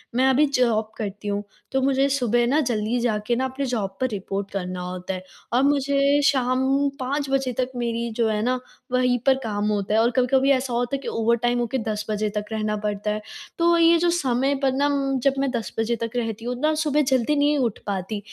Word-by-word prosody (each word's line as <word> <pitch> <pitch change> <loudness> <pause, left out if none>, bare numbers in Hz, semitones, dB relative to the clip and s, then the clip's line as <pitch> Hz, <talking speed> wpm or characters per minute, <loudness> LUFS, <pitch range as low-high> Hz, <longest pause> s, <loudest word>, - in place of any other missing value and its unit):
मैं 260 +2 +4
अभी 270 +3 +4
जॉब 235 -6 +1
करती 205 -1 -5
हूँ, 205 0 -1 0.3
तो 265 - +1
मुझे 270 +1 +2
सुबह 240 -3 +2
ना 285 +5 +3
जल्दी 220 +1 0
जाके 230 -1 0
ना 260 +2 0
अपने 265 +1 -3
जॉब 205 -7 -3
पर 260 - +3
रिपोर्ट 195 -1 -4
करना 180 -2 -4
होता 180 +1 -5
है, 185 0 -6 0.3
और 250 +2 +3
मुझे 280 0 +3
शाम 265 +2 +2
5 275 +2 -2
बजे 270 -2 0
तक 255 0 0
मेरी 235 -1 -2
जो 230 -1 +2
है 210 -1 0
ना, 250 +2 +1 0.3
वहीं 250 0 +2
पर 270 -1 +5
काम 210 -2 -1
होता 205 0 -1
है 220 - +4
और 235 +2 +3
कभी-कभी 265 +2 +3
ऐसा 260 -2 +1
होता 245 +3 0
है - - -3
कि - - -8
ओवरटाइम 235 +2 +1
होके 240 +2 -1
10 215 0 -2
बजे 215 0 0
तक 210 - -2
रहना 215 -1 -1
पड़ता 210 0 -2
है। 215 0 -3 0.4
तो 340 0 +4
ये 335 0 +6
जो 345 +1 +2
समय 270 -4 +1
पर 270 - +3
ना 280 +2 +1
उम, 275 -2 0
जब 275 +2 +2
मैं 275 0 +1
10 235 -3 -3
बजे 225 +1 +1
तक 230 - -3
रहती 225 -2 -3
हूँ 250 +1 -2
ना 310 +1 +3
सुबह 300 -1 +1
जल्दी 260 +3 +2
नहीं 290 +1 +3
उठ 240 -6 -1
पाती, 200 +1 -3
245 Hz, 225 wpm, -23 LUFS, 215-270 Hz, 0.4 s, ये